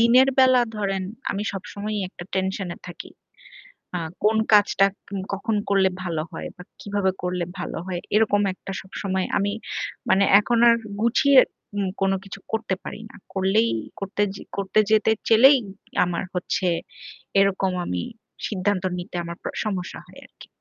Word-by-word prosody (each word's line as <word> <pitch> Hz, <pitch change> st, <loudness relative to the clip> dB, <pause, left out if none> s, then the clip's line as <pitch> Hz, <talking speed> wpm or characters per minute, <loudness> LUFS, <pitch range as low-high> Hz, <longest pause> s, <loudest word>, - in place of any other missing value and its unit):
দিনের 250 Hz, +3 st, +6 dB
বেলা 255 Hz, -1 st, +6 dB, 0.2 s
ধরেন 195 Hz, -2 st, -1 dB, 0.3 s
আমি 200 Hz, +1 st, -2 dB
সবসময়ই 205 Hz, +2 st, -4 dB
একটা 175 Hz, -, -10 dB
টেনশন 190 Hz, 0 st, -1 dB
এ -, -, -16 dB
থাকি। 175 Hz, -, -9 dB, 0.9 s
আ -, -, -2 dB, 0.2 s
কোন 220 Hz, +1 st, +4 dB, 0.2 s
কাজটা 205 Hz, -1 st, +5 dB, 0.3 s
উম 195 Hz, -, -2 dB
কখন 215 Hz, +3 st, -1 dB
করলে 195 Hz, -1 st, +4 dB
ভালো 165 Hz, -3 st, -2 dB
হয় -, -, -5 dB
বা 180 Hz, -, -11 dB, 0.2 s
কিভাবে 200 Hz, -2 st, 0 dB
করলে 180 Hz, -1 st, -1 dB
ভালো -, -, -4 dB
হয়। 175 Hz, -2 st, -3 dB
এরকম 210 Hz, -1 st, +4 dB
একটা 195 Hz, -, -9 dB
সবসময় 190 Hz, -1 st, -3 dB
আমি 200 Hz, +1 st, 0 dB, 0.6 s
মানে 195 Hz, +1 st, +5 dB, 0.2 s
এখন 235 Hz, +3 st, +1 dB
আর 230 Hz, -, +6 dB, 0.3 s
গুছিয়ে 260 Hz, +4 st, +5 dB, 0.4 s
উম 200 Hz, -2 st, 0 dB
কোন 195 Hz, -, +3 dB
কিছু 195 Hz, 0 st, -9 dB
করতে 220 Hz, -3 st, -1 dB
পারি 220 Hz, -, -7 dB
না। -, -, -15 dB, 0.2 s
করলেই 195 Hz, +4 st, +2 dB, 0.3 s
করতে 200 Hz, +1 st, -3 dB
যে -, -, -9 dB, 0.2 s
করতে 195 Hz, +2 st, +1 dB
যেতে 220 Hz, 0 st, +4 dB, 0.2 s
চাইলেই 260 Hz, +5 st, +7 dB, 0.5 s
আমার 175 Hz, +1 st, -2 dB
হচ্ছে 180 Hz, 0 st, -1 dB, 0.7 s
এরকম 195 Hz, -1 st, +2 dB
আমি 90 Hz, -1 st, -2 dB, 0.4 s
সিদ্ধান্ত 200 Hz, -1 st, -1 dB
নিতে 175 Hz, 0 st, -7 dB
আমার 170 Hz, 0 st, -6 dB
প -, -, -23 dB, 0.2 s
সমস্যা 190 Hz, -4 st, -3 dB
হয় -, -, -14 dB
আরকি। -, -, -16 dB
195 Hz, 155 wpm, -24 LUFS, 190-215 Hz, 0.9 s, চাইলেই